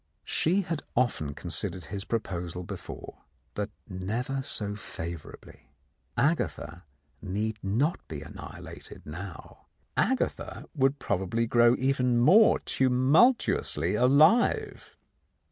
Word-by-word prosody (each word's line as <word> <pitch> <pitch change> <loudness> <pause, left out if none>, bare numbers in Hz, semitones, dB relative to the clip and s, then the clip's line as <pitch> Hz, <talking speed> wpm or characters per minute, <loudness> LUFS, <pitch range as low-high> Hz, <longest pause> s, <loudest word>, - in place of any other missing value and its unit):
She 180 +5 +1
had 170 -5 -3
often 80 - 0
considered 90 +4 -4
his 95 +6 -5
proposal 90 -6 -3
before, - - -8 0.3
but 105 0 -3 0.2
never 110 +8 -3
so 105 -5 -3
favourably. 85 -7 -9 0.5
Agatha 105 - -1 0.4
need 105 +3 -2
not 120 - 0
be 75 -1 -6
annihilated - - -10
now; 85 +3 -9 0.3
Agatha - - -1
would 135 0 +2
probably 95 0 -1
grow 120 +1 +5
even 125 -2 +1
more 185 - +6
tumultuously 130 - +3
alive. 145 - +3
115 Hz, 95 wpm, -28 LUFS, 90-135 Hz, 0.5 s, more